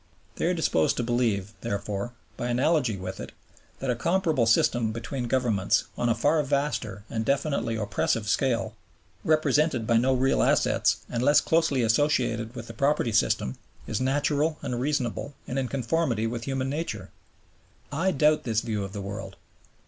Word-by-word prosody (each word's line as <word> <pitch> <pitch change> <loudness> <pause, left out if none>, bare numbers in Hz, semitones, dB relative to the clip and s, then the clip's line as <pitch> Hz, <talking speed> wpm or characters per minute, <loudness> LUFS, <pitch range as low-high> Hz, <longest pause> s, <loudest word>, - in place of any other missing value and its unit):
They - - -1
are 180 - +2
disposed 80 - +1
to 120 - 0
believe, 115 -5 0
therefore, 100 +3 -3 0.2
by 120 - -3
analogy 125 -2 +1
with 95 0 -6
it, - - -7 0.4
that 135 -2 -1
a - - 0
comparable 160 -2 +1
system 115 0 +3
between 120 +3 -4
Governments, 115 -6 +2
on 120 - 0
a 115 - +3
far 145 +7 +2
vaster 140 -8 -2
and 110 -1 -2
definitely 140 -2 0
oppressive 110 0 -1
scale, 115 -1 +1 0.5
represented 155 -5 +2
by 115 0 +3
no 130 +3 +3
real 130 +1 +2
assets, - - +3
and 120 - -2
less 145 +3 +5
closely 155 -6 +2
associated 120 -2 +1
with 120 -2 -6
the 115 - -9
property 140 -1 +1
system, 85 -11 +1 0.3
is - - -2
natural 145 +3 +1
and 120 -1 -2
reasonable 140 -1 -2
and 130 - -2
in 130 - -1
conformity 130 -2 0
with 115 +1 -3
human 135 -1 -1
nature. 125 - -4 0.8
I 165 +6 +1
doubt 150 -2 +3
this 115 -2 0
view 110 -4 -2
of 100 0 -7
the 100 - -4
world. 100 -1 -6
120 Hz, 165 wpm, -27 LUFS, 110-145 Hz, 0.8 s, less